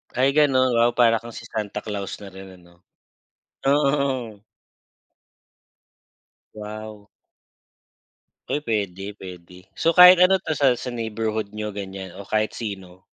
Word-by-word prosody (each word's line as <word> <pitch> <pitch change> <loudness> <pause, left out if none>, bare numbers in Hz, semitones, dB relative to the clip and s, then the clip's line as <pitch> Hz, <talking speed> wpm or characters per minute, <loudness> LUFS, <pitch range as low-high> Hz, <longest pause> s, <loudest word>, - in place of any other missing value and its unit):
Ay 130 +2 +3
ganun 135 -3 +3
wow! 120 0 +2
Para 115 -2 +4
kang 120 0 -11
si - - -9
Santa 105 -2 -5
Claus 100 -2 -5
na 100 - -10
rin 95 0 -12
ano, 85 0 -22 0.8
oo. 140 -6 0 2.1
Wow! 105 0 -9 1.4
Ay 150 - -2
pwede, 100 -3 -3
pwede. 90 -1 -11 0.2
So 165 - +2
kahit 180 +1 +8
ano 190 +1 +4
tasal 140 -7 +1
sa - - -7
neighborhood 110 -3 -3
niyo 105 0 -5
ganyan 95 -2 -7
o 100 - -9
kahit 110 +2 -1
sino? 95 -4 -7
110 Hz, 125 wpm, -23 LUFS, 100-130 Hz, 2.1 s, kahit